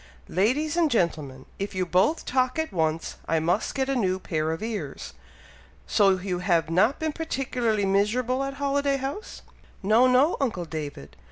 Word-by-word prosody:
"Ladies 260 Hz, -, +1 dB
and 340 Hz, -3 st, +3 dB
gentlemen! 155 Hz, -, -1 dB
If 200 Hz, 0 st, -4 dB
you 185 Hz, -1 st, 0 dB
both 185 Hz, -, +2 dB
talk 255 Hz, +1 st, +1 dB
at 320 Hz, -6 st, -2 dB
once, 160 Hz, -1 st, -1 dB
I 165 Hz, -, +2 dB
must 175 Hz, +6 st, 0 dB
get 265 Hz, -1 st, 0 dB
a 275 Hz, -, 0 dB
new 190 Hz, -6 st, +1 dB
pair 160 Hz, -4 st, -2 dB
of 165 Hz, +5 st, -4 dB
ears! 225 Hz, -2 st, -5 dB, 0.7 s
So 195 Hz, -3 st, +3 dB
you 180 Hz, -1 st, -3 dB
have 170 Hz, -3 st, +1 dB
not 215 Hz, -, +3 dB
been 315 Hz, -1 st, -2 dB
particularly 250 Hz, -9 st, -1 dB
miserable 230 Hz, +7 st, +1 dB
at 275 Hz, 0 st, -4 dB
Holiday 280 Hz, 0 st, 0 dB
House?" 275 Hz, -, -6 dB, 0.4 s
"No! 220 Hz, +6 st, +5 dB
no! 260 Hz, +6 st, +4 dB
uncle 215 Hz, -10 st, -1 dB
David! 145 Hz, -, -7 dB
210 Hz, 165 wpm, -26 LUFS, 175-270 Hz, 0.7 s, No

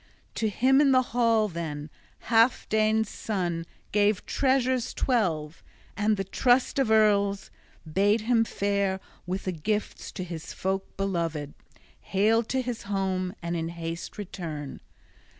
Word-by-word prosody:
To 220 Hz, -, 0 dB
him 265 Hz, +6 st, +4 dB
in 275 Hz, -2 st, +5 dB
the 255 Hz, 0 st, +5 dB
hall, 230 Hz, -3 st, +3 dB
then, 160 Hz, -4 st, -5 dB, 0.3 s
Healfdene's 220 Hz, -2 st, +3 dB
son 175 Hz, -7 st, -3 dB, 0.2 s
gave 205 Hz, -1 st, +2 dB
treasures 260 Hz, -2 st, +1 dB
twelve, 165 Hz, -, 0 dB, 0.3 s
and 210 Hz, 0 st, +1 dB
the 195 Hz, -, -1 dB
trust 245 Hz, +7 st, +2 dB
of 265 Hz, -5 st, +2 dB
earls 200 Hz, -2 st, +3 dB, 0.3 s
bade 200 Hz, +7 st, +2 dB
him 230 Hz, +1 st, +3 dB
fare 200 Hz, -3 st, 0 dB, 0.3 s
with 185 Hz, +2 st, -2 dB
the 185 Hz, -, -1 dB
gifts 210 Hz, +6 st, -3 dB
to 185 Hz, -, -4 dB
his 165 Hz, -3 st, -7 dB
folk 190 Hz, +1 st, -3 dB
beloved, 165 Hz, -7 st, -2 dB, 0.5 s
hale 215 Hz, +4 st, +2 dB
to 260 Hz, +3 st, -1 dB
his 245 Hz, -2 st, -4 dB
home, 190 Hz, -2 st, -2 dB
and 170 Hz, 0 st, -2 dB
in 165 Hz, 0 st, -2 dB
haste 170 Hz, +2 st, -6 dB
return. 165 Hz, -8 st, -6 dB
200 Hz, 135 wpm, -27 LUFS, 175-225 Hz, 0.5 s, in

